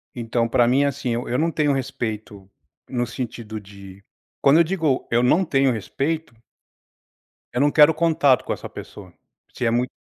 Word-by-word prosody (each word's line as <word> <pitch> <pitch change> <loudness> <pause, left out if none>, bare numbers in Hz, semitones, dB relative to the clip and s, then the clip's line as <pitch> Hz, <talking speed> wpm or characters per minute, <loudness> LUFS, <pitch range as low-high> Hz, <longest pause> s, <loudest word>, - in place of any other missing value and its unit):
Então 115 0 -1
pra 120 +1 +3
mim, 130 +4 +3
assim, 140 -2 -2
eu 120 +2 -3
eu 125 - 0
não 165 +3 +1
tenho 150 -2 +1
respeito 110 -6 -5 0.4
no 120 -2 -1
sentido 115 -3 -6
de 100 -1 -14 0.4
quando 140 +3 +5
eu - - +7
digo, 160 -6 -1
eu 120 +1 +3
não 170 +9 +3
tenho 135 -4 +2
respeito 140 - -3 1.2
eu 125 - -1
não 145 0 +3
quero 150 +1 +6
contato 155 -5 +2
com - - -1
essa - - -8
pessoa, - - -11 0.4
se 125 - -3
é 115 - +2
muito 125 +2 0
125 Hz, 175 wpm, -22 LUFS, 115-145 Hz, 1.2 s, eu